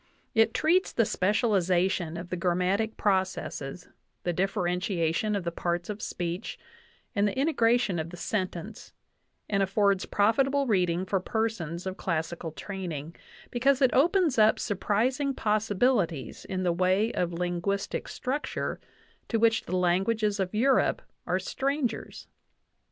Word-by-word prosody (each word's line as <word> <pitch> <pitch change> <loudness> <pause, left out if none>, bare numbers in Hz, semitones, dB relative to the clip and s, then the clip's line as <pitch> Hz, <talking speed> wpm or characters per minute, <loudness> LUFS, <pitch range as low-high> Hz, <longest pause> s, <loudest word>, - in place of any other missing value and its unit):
It 225 -1 +3
treats 360 +4 +3
the 230 - +2
specialization 185 -5 +1
of 170 +1 -7
the - - -2
grammatic 185 +5 0
processes, 185 -5 -1 0.4
the 175 - 0
dif 195 +3 0
ferentiation 180 +2 0
of 195 - -4
the 170 - -2
parts 175 +2 -2
of 210 - -7
speech, 175 +4 -4 0.6
and 205 -2 +2
the 205 - -3
integration 240 - +2
of 160 +1 -3
the 175 - -9
sentence, 190 +2 -4 0.5
and 200 -1 +1
affords 195 0 +2
profitable 270 +7 +2
reading 180 -5 +1
for 195 0 0
persons 185 -5 -2
of 190 0 -4
classical 165 -1 -3
training, 170 -4 -6 0.4
because 260 +2 +3
it 260 -3 +4
opens 335 - +3
up 215 0 +5
surprising 255 +8 0
possibilities 210 - 0
in 185 -1 -3
the 175 -2 +2
way 185 +5 +2
of 175 -1 -1
linguistic 175 +3 -2
structure 275 +4 -3 0.5
to 230 - 0
which 225 0 +3
the 185 - -1
languages 200 +4 +1
of 190 +1 -2
Europe 260 +4 +2 0.2
are - - +2
strangers. 275 -2 -2
195 Hz, 135 wpm, -28 LUFS, 175-225 Hz, 0.6 s, up